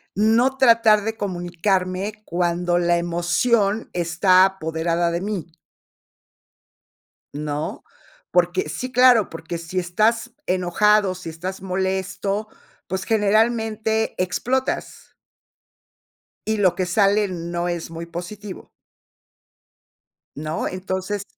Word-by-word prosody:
no 230 +6 +3
tratar 230 -4 +5
de 225 0 -2
comunicarme 185 +1 -1
cuando 175 0 0
la 175 0 +2
emoción 190 +6 +1
está 180 +2 +4
apoderada 170 -2 -1
de 170 +1 -2
mí 185 -5 -5 1.8
¿no? 150 0 -4 0.5
Porque 175 -2 +2
sí, 255 +9 -5
claro, 250 -4 +5
porque 165 +1 -6
si 170 +2 -7
estás 225 +7 0
enojado, 185 +2 +2
si 180 -2 -8
estás 180 +4 -6
molesto, 190 +2 -2 0.4
pues, 190 +1 -3
generalmente, 220 +1 +1
explotas 255 +8 -2 1.3
y 220 0 +1
lo 185 -4 +3
que 185 - -1
sale 200 +2 +3
no 175 -1 -3
es 170 -2 -4
muy 165 0 -7
positivo 185 +4 -8 1.7
¿no? 155 +2 -3
Entonces 190 +2 -3
185 Hz, 100 wpm, -22 LUFS, 175-215 Hz, 1.8 s, tratar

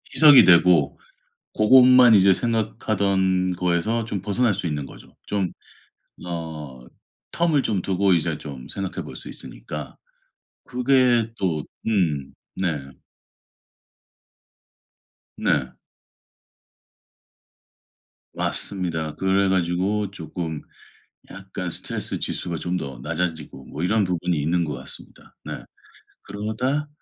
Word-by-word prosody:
희석이 150 -3 +9
되고 85 -5 +5 0.6
고것만 125 +1 +7
이제 100 -1 +6
생각하던 100 -5 0
거에서 90 +6 0
좀 105 -3 -4
벗어날 110 +3 +1
수 95 -1 -4
있는 75 -3 -3
거죠. - - -15
좀 100 -4 -1 0.7
어 80 -7 -7 0.5
term을 165 -5 +2
좀 100 -4 0
두고 95 +1 +2
이제 85 -3 0
좀 70 -4 -9
생각해 95 -1 -5
볼 - - -10
수 - - -10
있으니까 - - -8 0.7
그게 125 -2 +2
또 85 -6 -1 0.2
음. 85 -11 0 0.2
네. 75 -7 -2 2.5
네. 65 -3 0 2.6
맞습니다. 80 -5 -3
그래 95 +1 +2
가지고 95 +3 0
쪼끔 80 -3 -6 0.7
약간 95 -2 -6
스트레스 - - -4
지수가 85 - -3
좀 90 +3 -2
더 70 -5 -7
낮아지고 80 -1 -4
뭐 80 - -6
이런 110 +4 +2
부분이 90 -2 -1
있는 85 +4 +1
것 75 -3 -3
같습니다. - - -10
네. - - -7 0.6
그러다 110 +9 -2
95 Hz, 215 characters per minute, -23 LUFS, 85-110 Hz, 2.6 s, 희석이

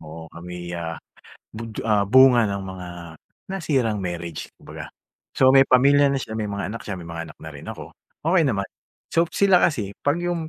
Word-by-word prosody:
Oo 80 +1 -10
kami, 90 +1 -8
ah, 85 -1 -4 0.6
bud 110 0 -6
ah, 105 -2 +3
bunga 125 -2 +6
ng 100 0 -3
mga 95 -1 -7 0.6
nasirang 135 - 0
marriage, 85 -3 -5
kumbaga. - - -9 0.5
So 130 0 +6
may 135 0 +7
pamilya 140 +3 +5
na - - 0
siya, 110 - -7
may 105 -2 -2
mga 100 0 -4
anak 115 - -6
siya, 100 -2 -4
may 85 - -9
mga 85 -1 -6
anak - - -37
na 80 - -8
rin 70 - -11
ako. - - -8 0.3
Okey 170 +1 +3
naman. 100 -4 0 0.5
So 165 - +4
sila 195 -3 +4
kasi 105 - +1
'pag 145 +2 +1
yung 170 -2 -2
105 Hz, 190 wpm, -23 LUFS, 90-135 Hz, 0.6 s, may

